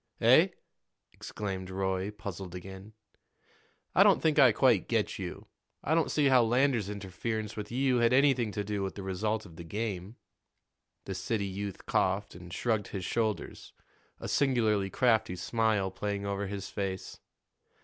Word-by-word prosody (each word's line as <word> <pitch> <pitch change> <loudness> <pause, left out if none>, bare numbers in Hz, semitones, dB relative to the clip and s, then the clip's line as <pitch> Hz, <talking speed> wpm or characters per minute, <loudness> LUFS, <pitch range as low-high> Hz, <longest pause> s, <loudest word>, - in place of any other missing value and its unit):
"Eh?" - - +6 0.7
exclaimed 95 -3 -5
Roy, 95 0 -1
puzzled 95 -3 -7
again. 95 +3 -9 1.0
"I - - +5
don't - - +6
think 155 -1 +2
I 130 -3 +8
quite 115 -4 +3
get - - 0
you. - - -6 0.4
I 155 - +1
don't 165 -1 +2
see 150 - +2
how 130 -2 +6
Lander's 120 -2 +2
interference 105 +2 -4
with 105 0 -6
you 130 0 +2
had 120 0 +3
anything 130 -4 +3
to 105 - -2
do 100 0 -3
with 95 -1 -3
the 100 - -6
result 105 +3 -2
of 80 -4 -14
the 85 - -7
game." 100 +2 -4 0.9
The 95 - -4
city 100 +3 -2
youth 100 0 -5
coughed 95 +2 0
and 85 0 -11
shrugged 110 +2 -1
his 95 -3 -5
shoulders, 110 0 -2 0.5
a - - -6
singularly 110 -8 +2
crafty 110 -4 +2
smile 105 0 0
playing 100 +1 -3
over 100 0 -2
his 100 0 -5
face. 95 -2 -5
105 Hz, 155 wpm, -30 LUFS, 95-115 Hz, 1.0 s, I